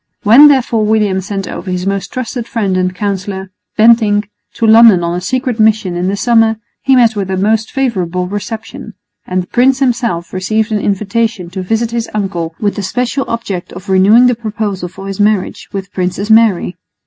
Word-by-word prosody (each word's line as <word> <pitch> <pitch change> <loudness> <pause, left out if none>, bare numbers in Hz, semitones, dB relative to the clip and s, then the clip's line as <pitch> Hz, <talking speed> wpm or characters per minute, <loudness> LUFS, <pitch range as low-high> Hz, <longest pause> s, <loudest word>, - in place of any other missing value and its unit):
When, 240 +8 +8
therefore, 250 -6 +2
William 210 -3 +1
sent 195 0 -5
over 190 - -7
his 180 0 -3
most 195 0 -3
trusted 245 -1 -5
friend 200 -5 -1
and 185 0 -1
counsellor, 195 -1 -4 0.3
Bentinck, 215 -2 +3 0.2
to 230 - -1
London 220 -5 +6
on 170 0 -1
a 180 - -3
secret 255 0 -2
mission 215 -4 +2
in 175 +1 -2
the 200 +1 -1
summer, 225 -1 +2 0.2
he 270 - +3
met 235 -3 +4
with 195 -2 -3
a 190 - -1
most 215 +3 0
favourable 185 -9 -1
reception; 210 +3 -7 0.3
and 185 0 -1
the - - -16
prince 255 +2 +3
himself 235 -10 -1
received 215 +4 -1
an 215 - 0
invitation 205 -1 -2
to 190 0 -5
visit 225 +5 -1
his 235 -1 -3
uncle 175 -5 -3
with 205 -1 -1
the - - -2
special 250 +7 -2
object 205 -6 -4
of 185 +3 -10
renewing 200 +6 +5
the 250 - +4
proposal 215 -5 -4
for 195 +2 -11
his 195 0 -6
marriage 205 -2 0
with 195 -1 -4
the 195 - -33
Princess 185 +3 -2
Mary. 220 -5 +3
210 Hz, 190 wpm, -13 LUFS, 190-230 Hz, 0.3 s, When